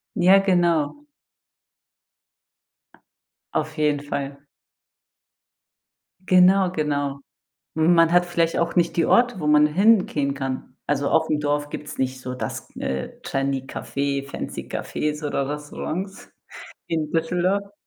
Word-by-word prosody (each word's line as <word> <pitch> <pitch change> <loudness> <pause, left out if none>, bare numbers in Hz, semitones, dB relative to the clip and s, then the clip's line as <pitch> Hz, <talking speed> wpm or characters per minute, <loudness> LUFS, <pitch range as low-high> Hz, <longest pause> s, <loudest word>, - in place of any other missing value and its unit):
Ja, 190 +1 +6
genau. 175 - +1 2.5
Auf 155 +1 -2
jeden 150 -1 +2
Fall. 140 -1 -5 1.9
Genau, 185 0 +5
genau. 145 -4 -2 0.6
M 160 +2 +4
man 165 0 +4
hat 175 0 +4
vielleicht 170 -1 0
auch 170 +1 -1
nicht 170 -1 +2
die 165 - +2
Orte, 240 -4 +3
wo 150 - -3
man 150 0 +6
hingehen 170 -6 +2
kann. 135 -1 -5
Also 140 -1 0
aufm 160 -2 +2
Dorf 145 0 -1
gibt's 150 0 -7
nicht 130 0 -2
so 130 0 -5
das, 110 -4 -6
äh, 65 0 -3
trendy 135 0 -1
Café, 140 +1 -3
fancy - - -5
Cafés 150 0 -3
oder 140 -1 -1
Restaurants 155 +6 -5 0.6
wie 165 - -1
in 155 -1 -2
Düsseldorf. 180 +5 0
155 Hz, 120 wpm, -23 LUFS, 140-175 Hz, 2.5 s, Ja